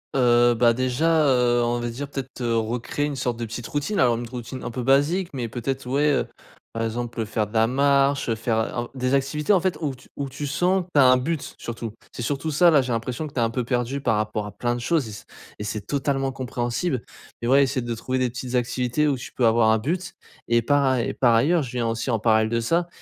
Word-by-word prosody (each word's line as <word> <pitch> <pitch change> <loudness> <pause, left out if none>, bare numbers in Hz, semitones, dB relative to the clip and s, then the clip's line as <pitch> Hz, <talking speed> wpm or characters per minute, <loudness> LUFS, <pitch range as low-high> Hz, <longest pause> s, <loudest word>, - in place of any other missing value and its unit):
Heu, 120 -2 +4
bah 115 0 +4
déjà, 150 +6 +2
heu, 120 -2 +3
on 120 0 0
va 120 - -3
dire 135 +5 -5
peut-être, 135 -2 -7
heu, 115 -1 0
recréer 120 +6 -1
une 145 - -4
sorte 125 -2 -2
de 120 - -2
petite 115 +1 -6
routine 145 - -2
alors 120 -2 +4
une 120 +1 -5
routine 125 +1 -7
un - - -3
peu 125 +1 -4
basique 145 +8 +2
mais 125 -4 -3
peut-être 130 +2 -4
ouais, 145 +3 +2
heu, - - 0 0.4
par 115 - -3
exemple, 120 +1 -4
heu, - - -1
faire 110 -1 -1
de 105 - -16
la 110 0 +4
marche, 140 +1 +2
heu, - - +2
en - - -3
faire, 115 0 -1 0.3
heu, 120 - -8
des 130 0 0
activités 150 +7 +1
en 185 - +5
fait 185 -2 0
où 145 -4 -2
tu 125 - -19
où 140 -1 -4
tu 145 +3 -5
sens 180 +6 +1
que - - -25
tu 145 - +4
as 130 - +7
un 130 - +6
but, 155 +3 -3
surtout 115 -2 -6 0.2
c'est - - -6
surtout 145 +5 -2
ça 170 +4 +5
là, 150 -5 +4
j'ai 125 - -4
l'impression 125 +6 -3
que 145 - -13
tu - - -2
es - - +2
un 115 - +1
peu 125 +1 -2
perdu 125 +3 -1
par 110 -5 +1
rapport 105 0 -2
à 105 - -7
plein 120 +4 -2
de 120 - -4
choses 150 0 0
et 110 - -7
c'est 100 - -10 0.3
et - - -5
c'est 105 0 -3
totalement 135 -1 0
compréhensible 125 +2 -2 0.4
et 120 - -2
ouais 140 +2 +5
essayer 135 -1 -1
de 120 -1 -3
trouver 130 +3 -2
des 125 -1 +1
petites 125 +1 -6
activités 125 +4 0
où 140 -3 +1
tu - - -9
peux 120 -3 +2
avoir 110 -1 +4
un 110 - +3
but 175 +8 -3 0.3
et 120 0 +3
par 145 +4 +2
aill 120 -2 0
et - - -3
par 120 -3 +4
ailleurs 150 +8 +3
je 125 - -7
viens 120 -2 -1
aussi 115 +3 -2
en 115 - +1
parallèle 110 0 +3
de 115 0 0
ça, 170 +9 +1
125 Hz, 265 wpm, -24 LUFS, 115-140 Hz, 0.4 s, as